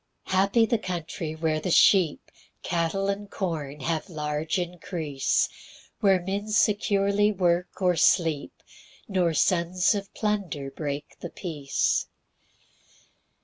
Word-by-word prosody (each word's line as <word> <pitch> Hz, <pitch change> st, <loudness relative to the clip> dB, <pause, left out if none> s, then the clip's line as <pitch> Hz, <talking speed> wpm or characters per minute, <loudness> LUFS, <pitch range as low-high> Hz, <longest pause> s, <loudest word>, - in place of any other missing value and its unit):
2 -, -, -9 dB
Happy 200 Hz, +5 st, +4 dB
the 235 Hz, -1 st, 0 dB
country, 165 Hz, -4 st, -4 dB
where 160 Hz, -1 st, 0 dB
the 170 Hz, -, -3 dB
sheep, 180 Hz, -2 st, +4 dB, 0.3 s
Cattle, 175 Hz, +3 st, -1 dB
and 200 Hz, +1 st, -3 dB
corn, 150 Hz, -8 st, -4 dB
have 160 Hz, +6 st, -2 dB
large 150 Hz, 0 st, -2 dB
increase; 170 Hz, -5 st, -1 dB, 0.5 s
Where 195 Hz, -2 st, +4 dB
men 195 Hz, +4 st, -3 dB
securely 205 Hz, -1 st, +2 dB
work 180 Hz, -1 st, 0 dB
or 180 Hz, -1 st, +3 dB
sleep, 160 Hz, -2 st, +1 dB, 0.4 s
Nor 180 Hz, -5 st, +1 dB
sons 180 Hz, +4 st, +2 dB
of 200 Hz, -1 st, -5 dB
plunder 195 Hz, -10 st, -2 dB
break 145 Hz, 0 st, -5 dB
the -, -, -6 dB
peace. 150 Hz, -7 st, -1 dB
175 Hz, 115 wpm, -26 LUFS, 155-195 Hz, 0.5 s, Happy